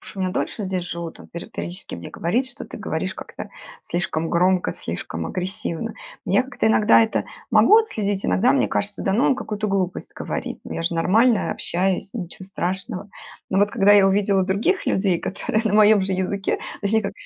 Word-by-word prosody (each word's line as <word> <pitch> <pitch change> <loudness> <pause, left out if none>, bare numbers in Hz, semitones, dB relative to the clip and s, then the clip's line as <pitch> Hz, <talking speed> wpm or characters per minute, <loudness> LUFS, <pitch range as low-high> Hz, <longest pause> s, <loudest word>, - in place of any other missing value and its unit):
Потому - - -10
что 195 - -7
меня 185 -1 0
дольше 205 +3 -3
здесь 185 -2 -2
живут, 170 -1 -6
там - - -13
пе 170 - -8
периодически 175 - -6
мне 85 - -8
говорит, 235 +10 0
что 265 +3 -6
ты - - -9
говоришь - - -3
как-то - - -8 0.3
слишком 165 -3 -2
громко, 180 +1 +2
слишком 80 0 -5
агрессивно. 185 - -4 0.3
Я 255 - +3
как-то 265 -4 0
иногда 220 0 +5
это 220 - 0 0.3
могу 430 - +6
отследить, 205 - -1
иногда 235 +6 +3
мне 280 - +2
кажется, 200 0 -1
да 195 - +1
ну 235 +7 +2
он 270 - +4
какую-то 215 -4 -4
глупость 190 -3 -2
говорит. - - -4
Ну - - -7
я 165 - -3
же 170 - +1
нормально 215 +8 +3
общаюсь, 190 +2 -1
ничего 190 -3 -6
страшного. 190 +2 -4 0.4
Но 190 - +2
вот 205 +1 +3
когда 200 +1 +4
я 200 -2 +7
увидела 195 -1 +2
других 210 - 0
людей, 190 -3 +2
которые 215 +5 -2
на 210 -2 +1
моём 215 -1 +6
же 190 0 -1
языке, 190 +1 -1 0.2
точнее 215 +2 +1
как 200 -1 -3
195 Hz, 190 wpm, -22 LUFS, 180-215 Hz, 0.4 s, я